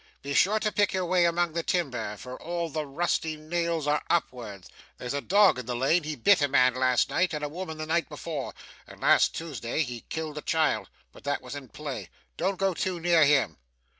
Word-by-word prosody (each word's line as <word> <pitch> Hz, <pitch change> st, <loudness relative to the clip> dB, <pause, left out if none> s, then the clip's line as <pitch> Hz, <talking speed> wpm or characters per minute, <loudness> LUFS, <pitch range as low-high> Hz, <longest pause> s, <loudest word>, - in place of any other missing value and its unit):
Be 140 Hz, 0 st, -3 dB
sure 210 Hz, +8 st, +4 dB
to 210 Hz, -, +1 dB
pick 205 Hz, -1 st, +2 dB
your 185 Hz, -1 st, 0 dB
way 175 Hz, 0 st, +3 dB
among 170 Hz, -1 st, +1 dB
the 170 Hz, -, 0 dB
timber, 125 Hz, -, -2 dB
for 125 Hz, +4 st, -8 dB
all 170 Hz, 0 st, -3 dB
the 155 Hz, 0 st, -3 dB
rusty 160 Hz, +1 st, -1 dB
nails 165 Hz, 0 st, -2 dB
are 150 Hz, 0 st, +1 dB
upwards. 115 Hz, -, -2 dB, 0.3 s
There's 125 Hz, +1 st, -4 dB
a 140 Hz, -, -1 dB
dog 200 Hz, -6 st, +4 dB
in 125 Hz, -, -7 dB
the 125 Hz, -, -2 dB
lane. 135 Hz, +8 st, +3 dB
He 155 Hz, 0 st, -4 dB
bit 180 Hz, -, +4 dB
a 145 Hz, -, +3 dB
man 130 Hz, -2 st, +4 dB
last 130 Hz, -1 st, +2 dB
night, 180 Hz, -2 st, +1 dB
and 150 Hz, -, -4 dB
a -, -, 0 dB
woman 160 Hz, +1 st, -6 dB
the 155 Hz, -, -4 dB
night 165 Hz, +2 st, 0 dB
before, 150 Hz, -2 st, -5 dB, 0.3 s
and -, -, -13 dB
last -, -, +4 dB
Tuesday 155 Hz, -3 st, -2 dB
he 120 Hz, -4 st, -6 dB
killed 155 Hz, -2 st, -4 dB
a -, -, -8 dB
child 160 Hz, 0 st, +1 dB, 0.2 s
but -, -, -16 dB
that 145 Hz, -1 st, -1 dB
was 125 Hz, -, -8 dB
in 140 Hz, -3 st, -8 dB
play. 145 Hz, -4 st, -6 dB, 0.3 s
Don't 190 Hz, +3 st, -1 dB
go 195 Hz, -1 st, +1 dB
too 180 Hz, +1 st, -2 dB
near 170 Hz, -2 st, +5 dB
him. 140 Hz, -, +3 dB
155 Hz, 220 wpm, -27 LUFS, 135-170 Hz, 0.3 s, near